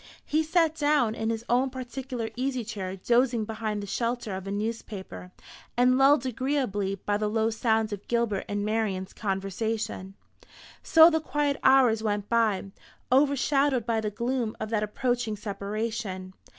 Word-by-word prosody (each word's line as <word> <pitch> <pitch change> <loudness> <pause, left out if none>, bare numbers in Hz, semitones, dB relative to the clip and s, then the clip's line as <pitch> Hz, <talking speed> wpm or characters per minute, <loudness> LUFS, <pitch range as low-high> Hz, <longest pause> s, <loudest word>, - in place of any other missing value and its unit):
He 310 +1 +1
sat 320 0 +2
down 290 -7 +2
in 225 0 -2
his 225 0 -3
own 255 +2 +2
particular 255 -2 -5
easy 255 0 -1
chair, 195 -4 -5
dozing 235 +3 +2
behind 215 -1 -3
the - - -4
shelter 230 0 -2
of 190 +1 -7
a - - -3
newspaper, 205 -3 -5 0.5
and 250 +1 +5
lulled 275 +1 +5
agreeably 250 -6 -1
by 205 +2 -1
the 210 0 -1
low 220 +1 +1
sound 220 -1 +1
of 205 0 -8
Gilbert 235 -4 0
and 205 0 -1
Marian's 210 -4 -1
conversation. 195 0 -3 0.7
So 325 +1 +7
the 320 0 +1
quiet 295 -2 0
hours 255 -5 +5
went 205 -2 -2
by, 215 -4 +1 0.4
overshadowed 275 -2 +3
by 225 -1 0
the 215 - -1
gloom 235 +1 -2
of 215 - -4
that 215 -2 +1
approaching 230 +1 -1
separation. 205 -2 -4
225 Hz, 150 wpm, -27 LUFS, 205-255 Hz, 0.7 s, So